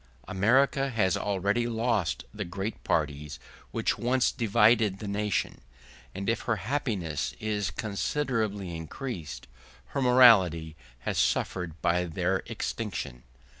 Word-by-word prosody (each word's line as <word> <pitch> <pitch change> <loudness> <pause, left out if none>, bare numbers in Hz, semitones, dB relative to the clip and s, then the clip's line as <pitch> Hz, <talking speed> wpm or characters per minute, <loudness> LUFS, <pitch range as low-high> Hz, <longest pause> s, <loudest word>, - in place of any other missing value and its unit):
America 130 +8 +3
has 100 -7 +1
already 100 +4 0
lost 110 - 0
the 105 -1 -4
great 95 +4 -5
parties 75 -2 -1 0.3
which - - -1
once 125 +1 +2
divided 110 -2 +3
the 105 - -7
nation; 105 0 -1 0.5
and 100 +1 -4
if 115 - +1
her 115 - +3
happiness 100 - -2
is 105 -2 -1
considerably 110 - -2
increased, 80 - -6 0.4
her 140 - -2
morality 100 - +5 0.3
has - - -1
suffered 85 -3 0
by 85 +1 +2
their 80 -3 0
extinction. 60 0 -4
105 Hz, 115 wpm, -28 LUFS, 90-115 Hz, 0.5 s, morality